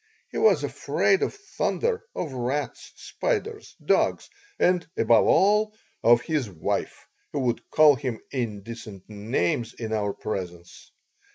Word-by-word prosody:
He - - -3
was 445 - +4
afraid 385 - +1
of 425 - -1
thunder, 450 +3 -2
of 155 -6 -4
rats, 130 +4 -3
spiders, 445 -3 -3
dogs, - - +1 0.3
and, 180 -1 +2
above 115 0 +4
all, 210 +2 +3 0.3
of 120 0 +5
his 150 -8 -1
wife, 85 -5 -3 0.3
who 145 - -1
would 120 -2 -2
call 155 -1 +6
him 125 -2 -4
indecent 110 -4 -6
names 110 +1 -1
in 110 -2 -4
our 105 -2 0
presence. 90 -4 -6
125 Hz, 125 wpm, -25 LUFS, -, 0.3 s, call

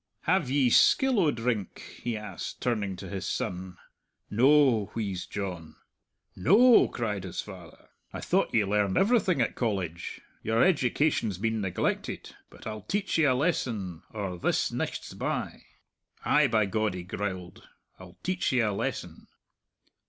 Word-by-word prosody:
"Have 170 -6 +1
ye 135 -3 +3
skill 265 - +5
o' 165 -5 +4
drink?" 115 -6 -3
he 120 -2 -2
asked, 105 0 -7
turning 105 -6 -1
to 90 - -8
his 95 -3 -5
son. 90 0 -4 0.5
"No," 130 -2 +4
wheezed 100 -5 -4
John. 90 -5 -5 0.6
"No!" 215 - +6
cried 105 -5 -3
his 90 -3 -6
father. - - -12 0.2
"I - - -6
thought - - +1
ye 110 -3 +2
learned 100 -1 +1
everything 195 - +3
at 115 - 0
College! 95 -8 -3 0.2
Your 110 +2 +2
education's 145 - +1
been 110 +2 -1
neglected. 95 -3 -2 0.2
But - - -15
I'll 110 -1 -5
teach 200 - -2
ye 160 - +5
a 130 -3 +4
lesson 115 - -1
or 95 -5 -4
this - - +1
nicht's - - -4
by. - - -4 0.6
Ay, - - +4
by 110 -2 +2
God," 110 0 -1
he 90 - -5
growled, 95 -1 -5 0.3
"I'll 90 -1 -13
teach 185 0 0
ye 130 - +2
a 105 -3 +1
lesson." - - -4
110 Hz, 145 wpm, -28 LUFS, 95-135 Hz, 0.6 s, No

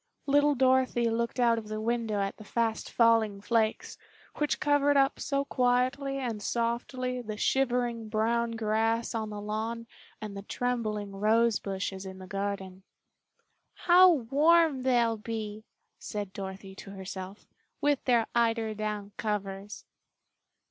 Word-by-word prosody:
Little 290 +1 +3
Dorothy 255 -2 +2
looked 235 +2 -2
out 235 -2 +3
of 215 - -10
the 215 0 -4
window 225 -2 -1
at 195 0 -3
the 215 - -11
fast 225 +1 -1
falling 225 -3 +3
flakes, 220 +1 -1 0.4
which 295 -1 0
covered 290 -1 +3
up 270 0 +3
so 280 -1 -1
quietly 255 +2 +1
and 235 -6 -3
softly 245 +3 -2
the 215 -2 -6
shivering 240 -3 0
brown 230 +2 0
grass 225 +1 0
on 220 -2 -3
the 210 -1 -6
lawn 220 +3 -3 0.3
and 210 -2 -7
the 200 - -5
trembling 215 -2 -2
rose 220 +3 +2
bushes 195 -1 -4
in 190 -1 -8
the 190 - -10
garden. 195 -1 -4 0.9
"How 365 +1 +6
warm 300 +2 +3
they'll 240 -3 +2
be," 215 -1 -5 0.3
said 205 -3 -5
Dorothy 190 0 -7
to 200 - -10
herself, 190 0 -8 0.3
"with 290 -2 +1
their 235 -3 +3
eiderdown 215 -3 -1
covers." 200 -1 -4
230 Hz, 135 wpm, -29 LUFS, 210-250 Hz, 0.9 s, How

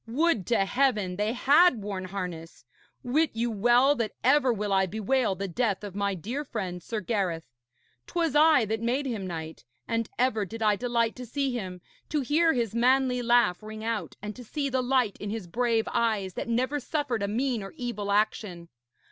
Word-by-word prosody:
Would 255 - +1
to 225 -5 +2
Heaven 210 -7 +1
they 210 +2 0
had 280 - +4
worn 195 -2 -4
harness! 180 -6 -6 0.4
Wit 295 +5 +2
you 235 +1 0
well 240 +6 +4
that 230 -2 -2
ever 265 -1 +4
will 210 -3 -1
I 190 -1 +3
bewail 220 +2 0
the 195 +1 -4
death 210 +2 -1
of 205 -3 -6
my 200 0 -1
dear 235 - -4
friend, 190 -9 -5
Sir 215 +5 -4
Gareth. 185 -5 -1 0.6
'Twas 330 -4 -1
I 305 -5 +6
that 220 +1 -2
made 250 +5 0
him 220 -7 -3
knight, 160 -4 -6 0.2
and 230 -1 -1
ever 245 -4 +1
did 225 +3 -5
I 210 -1 +4
delight 235 0 0
to 250 - -7
see 275 +2 -1
him, 185 -6 -5 0.3
to 300 -1 0
hear 320 +5 +3
his 235 -5 -1
manly 250 +1 +2
laugh 235 -6 +3
ring 215 0 -8
out, 220 -7 -3
and 210 0 -5
to 250 - -10
see 280 +4 -3
the 260 -1 0
light 250 -4 +1
in 205 - -5
his 215 -2 -4
brave 230 +4 0
eyes 210 -5 0
that - - -5
never 255 +5 0
suffered 280 -5 -2
a 200 - 0
mean 240 +2 -1
or 195 - -7
evil 210 -5 -3
action. 200 -4 -1
230 Hz, 190 wpm, -27 LUFS, 200-255 Hz, 0.6 s, I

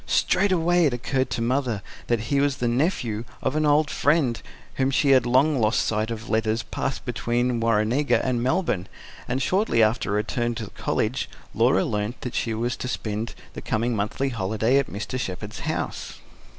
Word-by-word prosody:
Straightway 175 -3 +3
it 135 -5 +2
occurred 130 +2 -1
to 120 -1 -2
Mother 120 -4 0 0.2
that 120 -2 +1
he 140 +5 0
was 140 -1 +1
the 120 - 0
nephew 120 - 0 0.2
of 130 - 0
an 155 0 +2
old 150 0 +3
friend 145 -6 +2 0.4
whom 130 0 +2
she 140 +1 +3
had 130 -3 +5
long 135 +3 +3
lost 110 -1 +2
sight 110 0 0
of 115 0 -5
letters 110 0 0
passed 135 +3 -4
between 120 0 0
Warrenega 115 +5 +2
and 125 -2 0
Melbourne, 125 - 0 0.4
and 130 +2 -1
shortly 185 - +2
after 110 0 +1
her 100 - +1
return 120 +3 -1
to 115 - -4
the 105 - -9
College - - -1 0.2
Laura - - +3
learnt 105 +3 -3
that 125 - -5
she 115 -2 -1
was 120 +3 -1
to - - -4
spend 110 -2 -3 0.2
the - - -7
coming 115 +2 -1
monthly 110 +6 -1
holiday 110 +3 +1
at 140 - -1
Mr. 110 +5 -4
Shepherd's 105 0 -5
house. - - -3
120 Hz, 180 wpm, -24 LUFS, 110-135 Hz, 0.4 s, had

